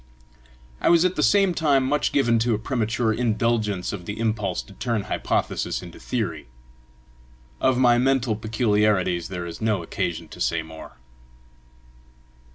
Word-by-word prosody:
I - - +3
was 170 +1 +5
at 185 0 +1
the - - 0
same 195 -3 +4
time 145 -5 +2
much 145 +2 +1
given 115 -5 +2
to 115 0 +1
a - - -2
premature 110 -1 -1
indulgence 110 -4 0
of 90 -4 -7
the 105 - -4
impulse 110 -5 -1
to 100 - -15
turn 115 0 -2
hypothesis 105 - -2
into - - -11
theory. - - -3 1.1
Of 130 -1 +2
my 120 -2 +4
mental 130 -3 +2
peculiarities 105 -5 +1
there 90 -2 -5
is 85 +3 -8
no 105 -5 0
occasion 85 0 -3
to - - -11
say 80 +7 0
more. 80 0 -11
110 Hz, 150 wpm, -24 LUFS, 100-125 Hz, 1.1 s, was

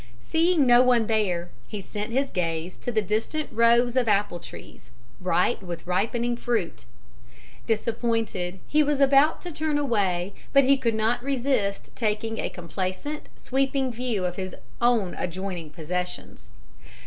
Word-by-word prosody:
Seeing 325 - +2
no 240 0 +7
one 245 -3 +4
there, 185 -6 0 0.2
he 210 - -5
sent 210 +3 -5
his 270 +3 0
gaze 165 0 -2
to 245 - -4
the 220 -2 +1
distant 220 - -2
rows 235 +1 +4
of 255 -3 +2
apple 205 -4 +1
trees, 130 -6 -12 0.3
bright 180 +5 +1
with 175 -3 -7
ripening 230 +7 0
fruit. 225 - -2 0.8
Disappointed, 225 -5 -1
he 305 - +3
was 295 -1 +1
about 280 +3 +5
to 355 - -5
turn 310 -1 -1
away, 200 -9 0 0.2
but 275 0 +7
he 275 +2 +5
could 235 -4 0
not 225 +3 +1
resist 255 -6 -1
taking 225 0 -1
a - - -1
complacent, 185 - -5
sweeping 270 0 0
view 235 -5 -2
of 180 0 -3
his 185 -1 -4 0.3
own 235 -6 +3
adjoining 180 -2 -4
possessions. 170 - -5
225 Hz, 145 wpm, -26 LUFS, 185-255 Hz, 0.8 s, no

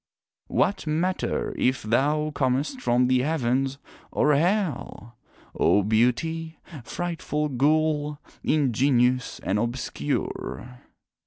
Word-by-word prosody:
What 195 -4 0
matter, 175 +5 -1
if 130 0 +1
thou 145 +7 +1
comest 140 - -1
from 125 - +3
the 130 0 +3
Heavens 135 -2 0 0.3
or 150 - +3
Hell, 165 - -1 0.4
O 100 - +3
Beauty, 160 - 0 0.3
frightful 160 -2 -3
ghoul, 150 +2 +1 0.3
ingenuous 125 -3 +2
and 100 +2 0
obscure! 125 +1 -3
140 Hz, 90 wpm, -25 LUFS, 125-155 Hz, 0.4 s, from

